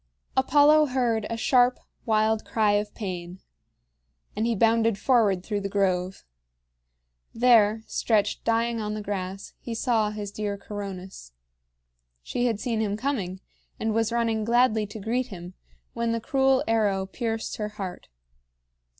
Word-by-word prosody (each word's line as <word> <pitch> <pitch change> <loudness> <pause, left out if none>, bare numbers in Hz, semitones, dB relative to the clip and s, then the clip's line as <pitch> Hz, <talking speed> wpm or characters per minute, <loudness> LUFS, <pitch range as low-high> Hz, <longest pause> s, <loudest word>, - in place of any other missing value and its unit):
Apollo 295 +3 +5
heard 240 -5 0
a 230 - -3
sharp, 250 +1 +3 0.3
wild 220 0 +2
cry 215 -2 +1
of 205 0 0
pain; 180 -3 -6 1.0
and 220 +2 0
he 235 - +1
bounded 225 0 +3
forward 210 -6 +2
through 205 0 -2
the 200 - -3
grove. 190 -2 0 1.1
There, 225 -2 +4
stretched 215 -3 0
dying 230 0 0
on 210 0 -3
the 215 - -5
grass, 195 -1 -5
he 235 - -6
saw 225 -2 +1
his 210 -1 -6
dear 205 -1 -3
Coronis. 195 - -8 0.9
She 245 0 -1
had 225 -4 -1
seen 230 -3 -1
him 205 -1 -1
coming, 210 -8 -3 0.4
and 220 0 -1
was 225 0 +1
running 230 -2 0
gladly 230 -2 +2
to 205 - -9
greet 240 +5 -1
him, 180 -5 -9 0.4
when 235 0 -1
the 230 - -1
cruel 265 +2 +2
arrow 205 -4 +1
pierced 225 +2 -4
her 210 -1 -3
heart. 195 -4 -7
220 Hz, 140 wpm, -26 LUFS, 200-235 Hz, 1.1 s, Apollo